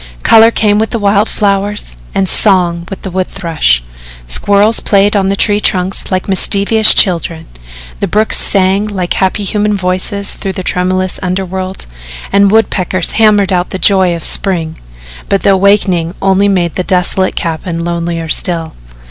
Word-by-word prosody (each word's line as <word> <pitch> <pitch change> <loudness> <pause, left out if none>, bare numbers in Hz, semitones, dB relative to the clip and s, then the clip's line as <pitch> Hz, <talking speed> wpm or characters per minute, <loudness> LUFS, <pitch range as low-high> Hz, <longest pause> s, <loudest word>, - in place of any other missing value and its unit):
Colour 225 0 +6
came 210 -2 +1
with 220 - -1
the 235 - -3
wild 205 0 +1
flowers 200 - -2 0.2
and 195 - 0
song 175 -4 +1
with 195 - -8
the 190 - -6
wood 185 +1 -2
thrush. 155 - 0 0.4
Squirrels 205 - +1
played 200 +1 +1
on 195 -1 +1
the 195 - 0
tree 205 +1 +1
trunks 190 -1 -1
like 185 0 -2
mischievous 200 +3 +4
children, 170 -3 +1 0.5
the - - -1
brooks 215 +1 +1
sang 195 +1 +1
like 185 -4 -3
happy 190 +2 -1
human 210 +1 -1
voices 185 +2 -1
through 195 - -5
the 185 - -6
tremulous 185 +1 -1
underworld 185 0 -4 0.5
and 200 0 +3
woodpeckers 190 -4 0
hammered 205 -3 +2
out 180 0 -1
the - - -5
joy 190 -2 +2
of 165 - -7
spring, 165 -5 -1 0.5
but 195 - 0
the 200 - +4
awakening 190 -3 +1
only 195 +1 +1
made 180 -4 0
the 185 - -3
desolate 185 0 0
cabin 165 0 -4
lonelier 170 -1 -3
still. 165 0 -1
190 Hz, 155 wpm, -11 LUFS, 180-200 Hz, 0.5 s, Colour